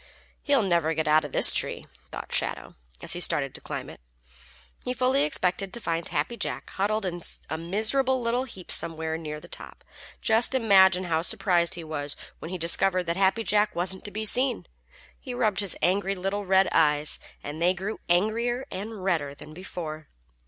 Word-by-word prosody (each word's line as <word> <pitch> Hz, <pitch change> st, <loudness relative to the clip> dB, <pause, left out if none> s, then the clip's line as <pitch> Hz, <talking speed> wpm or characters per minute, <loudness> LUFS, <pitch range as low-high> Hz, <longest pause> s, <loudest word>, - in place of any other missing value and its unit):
"He 285 Hz, -, +2 dB
never'll 170 Hz, -5 st, +1 dB
get 160 Hz, 0 st, -1 dB
out 155 Hz, 0 st, +4 dB
of 145 Hz, -, -8 dB
this -, -, +9 dB
tree," -, -, 0 dB, 0.3 s
thought -, -, -7 dB
Shadow, -, -, -2 dB, 0.3 s
as -, -, +2 dB
he -, -, -4 dB
started -, -, +1 dB
to -, -, -8 dB
climb -, -, -6 dB
it. -, -, -12 dB, 0.8 s
He 250 Hz, -, -3 dB
fully 255 Hz, +2 st, +2 dB
expected 190 Hz, -8 st, 0 dB
to 235 Hz, -, -4 dB
find 165 Hz, -6 st, -2 dB
Happy 155 Hz, +12 st, -2 dB
Jack -, -, -4 dB
huddled 210 Hz, +2 st, -1 dB
in 175 Hz, -1 st, -4 dB, 0.3 s
a 160 Hz, -, -1 dB
miserable 220 Hz, +10 st, +1 dB
little 245 Hz, +2 st, -1 dB
heap 190 Hz, -8 st, -9 dB
somewhere 160 Hz, -1 st, 0 dB
near 155 Hz, -2 st, -6 dB
the -, -, -13 dB
top. -, -, -9 dB, 0.4 s
Just 230 Hz, +4 st, +2 dB
imagine 190 Hz, -6 st, +5 dB
how 165 Hz, -3 st, 0 dB
surprised 175 Hz, -1 st, +1 dB
he 170 Hz, -, -7 dB
was 145 Hz, -2 st, -3 dB, 0.2 s
when 160 Hz, -, -7 dB
he 185 Hz, -, -4 dB
discovered 180 Hz, +2 st, +2 dB
that 170 Hz, -1 st, -2 dB
Happy 195 Hz, +4 st, +2 dB
Jack 210 Hz, 0 st, +1 dB
wasn't 185 Hz, +2 st, -2 dB
to -, -, -2 dB
be 215 Hz, +1 st, -4 dB
seen. 250 Hz, +3 st, +3 dB, 0.5 s
He 255 Hz, -3 st, -7 dB
rubbed 215 Hz, -6 st, +1 dB
his 200 Hz, -3 st, +1 dB
angry 195 Hz, +2 st, +1 dB
little 195 Hz, +2 st, -3 dB
red 190 Hz, 0 st, +4 dB
eyes, 150 Hz, -1 st, +2 dB, 0.2 s
and 150 Hz, +3 st, -6 dB
they 180 Hz, +2 st, +3 dB
grew 195 Hz, +4 st, -5 dB
angrier 230 Hz, +8 st, +1 dB
and 205 Hz, 0 st, -6 dB
redder 155 Hz, -7 st, -1 dB
than 155 Hz, +2 st, -12 dB
before. 155 Hz, -3 st, -6 dB
190 Hz, 185 wpm, -26 LUFS, 165-220 Hz, 0.8 s, this